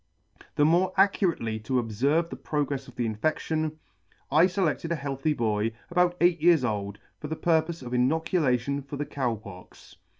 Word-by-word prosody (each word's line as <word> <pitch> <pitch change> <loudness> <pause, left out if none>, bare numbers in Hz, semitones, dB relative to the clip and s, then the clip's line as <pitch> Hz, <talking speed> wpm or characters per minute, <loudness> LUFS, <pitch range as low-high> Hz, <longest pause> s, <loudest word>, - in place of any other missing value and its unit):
THE 145 - +4
more 180 +4 +3
accurately 170 - +2
to 110 +5 -6
obferve 130 +8 +1
the - - -4
progrefs 140 -3 -3
of 130 - -14
the 120 - -1
infedtion, 155 +7 -1 0.6
I 160 +5 +6
feledted 180 -3 -1
a - - +2
healthy 140 +1 -2
boy, 110 -3 0 0.2
about 180 0 +2
eight 175 -2 +3
years 165 -4 +5
old, 100 -3 -3 0.2
for 150 - -6
the 160 - -3
purpofe 160 -1 0
of 125 0 -7
INOCULATION 140 -1 +1
FOR 140 +1 -8
THE 145 - -2
COW 130 -5 -2
POX. 100 -4 -13
145 Hz, 165 wpm, -27 LUFS, 120-165 Hz, 0.6 s, I